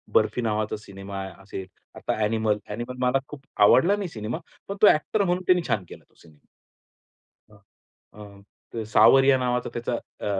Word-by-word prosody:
बर्फी 110 +3 +2
नावाचा 110 -1 -1
सिनेमा 100 -1 -8 0.2
असेल, 95 -1 -7 0.3
आता - - -3
ॲनिमल. 110 -1 +1
ॲनिमल 120 +4 -6
मला 135 +2 +2
खूप 145 -2 -10 0.2
आवडला 170 - +5
नाही 200 -4 -4
सिनेमा, 110 -2 -5 0.3
पण 200 - -4
तो 210 - +8
ॲक्टर 200 +7 +3
म्हणून 180 0 0
त्यांनी 180 -1 +4
छान 100 -4 0
केला - - -12
तो - - -34
सिनेमा. 80 -3 -21 1.1
अ, - - -18 0.6
अ, 105 +2 -11
सावरिया 135 +5 +6
नावाचा 125 -1 -1
त्याचा 120 +1 -3 0.3
अ, - - -6
115 Hz, 155 wpm, -25 LUFS, 105-135 Hz, 1.1 s, तो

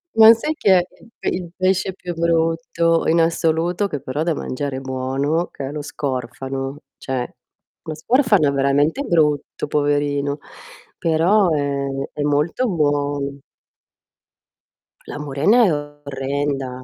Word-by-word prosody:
Ma 225 0 +9
sai 300 +7 -2
che 190 -7 +4
è - - 0 0.2
il - - -18
pe - - -1
il 175 -2 -4
pesce 185 0 +1
più 180 -1 -6
brutto 165 0 +1
in 165 +1 +4
assoluto, 165 +3 +1
che 145 -7 -5
però 140 +4 -2
da 165 -2 0
mangiare 135 0 -4
è - - -3
buono, 135 +5 -1
che 135 - -6
è - - -6
lo 150 0 -4
scorfano? 135 0 -4 0.2
Cioè, 130 -2 -4 0.5
lo 155 - -5
scorfano 205 - +3
è - - 0
veramente 140 - +1
brutto, 150 - 0
poverino, 145 -1 0 0.6
però 175 +5 +3
è 140 -2 -1 0.2
è 150 - -5
molto 150 - +1
buon 145 -4 -1 1.6
La - - -7
murena 150 - +3
è 175 - +3
orrenda. 140 -2 -4
150 Hz, 135 wpm, -20 LUFS, 140-170 Hz, 1.6 s, Ma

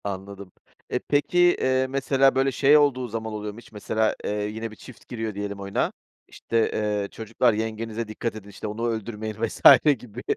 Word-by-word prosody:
Anladım. 100 -1 -7 0.4
E, 125 - -1
peki, 145 +6 0
eee, 130 -7 +3
mesela, 135 0 +2
böyle, 135 +1 +2
şey 140 +3 +5
olduğu 135 -4 +2
zaman 110 0 -5
oluyor 105 -1 -5
mu 110 - -11
hiç - - -17
mesela, 110 +1 -1
eee, - - -2 0.2
yine 110 +1 -5
bir - - -12
çift 125 +2 -15
giriyor 110 -3 -4
diyelim 100 0 -5
oyuna, 100 0 -1 0.4
işte, 115 -1 -1
eee, 105 -1 -1
"Çocuklar 115 +2 +1
yengenize 110 +1 -3
dikkat 110 +1 -4
edin, 105 -2 -10
işte, 105 +2 -7
onu 110 +3 -3
öldürmeyin." 110 -1 -4
vs. 115 - -3 0.4
gibi 120 +1 -10
110 Hz, 180 wpm, -25 LUFS, 105-125 Hz, 0.4 s, şey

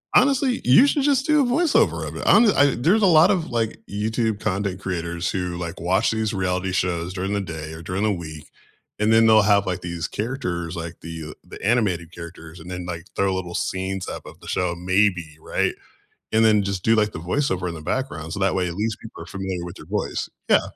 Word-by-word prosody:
Honestly, 260 -1 +3
you 135 - +7
should 280 -1 +1
just 275 -2 +2
do 300 -1 +4
a - - +1
voiceover 245 - +2
of 75 - -7
it - - -5
on 210 +6 +7
the 210 - +4
I 145 - +7
there's 180 - +3
a - - +7
lot 170 0 +6
of, 175 -4 -1
like, 115 -2 -1
YouTube 110 +1 -1
content 100 -1 -2
creators 85 -2 -3
who, 90 -2 -3
like, 85 -1 -5
watch 90 +3 +2
these 110 -1 -1
reality 95 -1 -1
shows 90 -1 -1
during 95 +1 -2
the 100 - 0
day 80 -3 -6
or 80 - -9
during 95 +3 -3
the 110 - +2
week, 80 -5 -7 0.5
and 105 +1 +3
then 115 0 +6
they'll 110 -1 +7
have, 100 -1 +3
like, 90 - -2
these 85 -2 -4
characters, 90 -8 -3
like 85 0 -6
the, 80 -1 -7
uh - - -8
the - - -11
animated 95 -7 +1
characters, 85 -2 -10
and 90 +3 -10
then, 90 -1 -5
like, 85 -1 -5
throw 95 -1 +1
little 90 -2 -4
scenes 95 0 -2
up - - -6
of - - -12
the - - -14
show, 90 -1 0
maybe, 90 -3 +1
right? - - -1 0.6
And 110 +1 +4
then 105 -2 +4
just 100 -2 -3
do, 115 0 +4
like, 105 -1 +2
the - - -7
voiceover 95 - -1
in 85 - -4
the 80 - -8
background 80 - -3
so 100 - -4
that 95 -1 +1
way 90 -1 0
at 85 - -5
least 110 +1 -2
people 115 - -10
are - - -12
familiar 95 -1 -4
with 85 - -8
your - - -12
voice. - - -2 0.2
Yeah. - - +6
95 Hz, 230 wpm, -23 LUFS, 85-110 Hz, 0.6 s, you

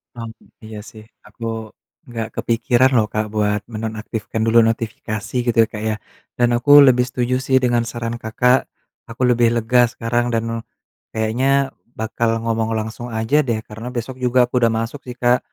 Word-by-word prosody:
Mmm, 115 -1 -6 0.3
iya, 110 0 -8
sih. 110 -1 -13 0.2
Aku 105 +2 -13 0.6
enggak 115 -2 -5
kepikiran, 120 +2 +2
loh, 110 -3 +4
Kak, 110 0 0
buat 105 -1 +1
menonaktifkan 110 0 -4
dulu 115 +1 +5
notifikasi 115 0 -4
gitu, 115 -1 +2
Kak, 105 - -6
ya. 110 - 0 0.4
Dan 120 -1 +3
aku 125 +4 +1 0.2
lebih 125 -1 +4
setuju, 125 0 -1
sih, 130 -1 +3
dengan 120 -1 +2
saran 115 0 -4
Kakak, 125 +3 +2 0.5
aku 115 +2 -9
lebih 120 -1 +4
lega 120 +2 +2
sekarang 120 0 -1
dan, 115 -1 +1 0.7
kayaknya 110 +4 0 0.5
bakal 115 +1 -1
ngomong 115 -1 -1
langsung 110 +2 -6
aja, 110 +6 0
deh, 115 -2 0
karena 110 +3 -8
besok 125 +2 -4
juga 125 +1 +2
aku 125 - -8
udah 115 -1 +3
masuk, 115 +5 -4
sih, 125 - -6
Kak. 125 0 +4
115 Hz, 160 wpm, -20 LUFS, 110-120 Hz, 0.7 s, dulu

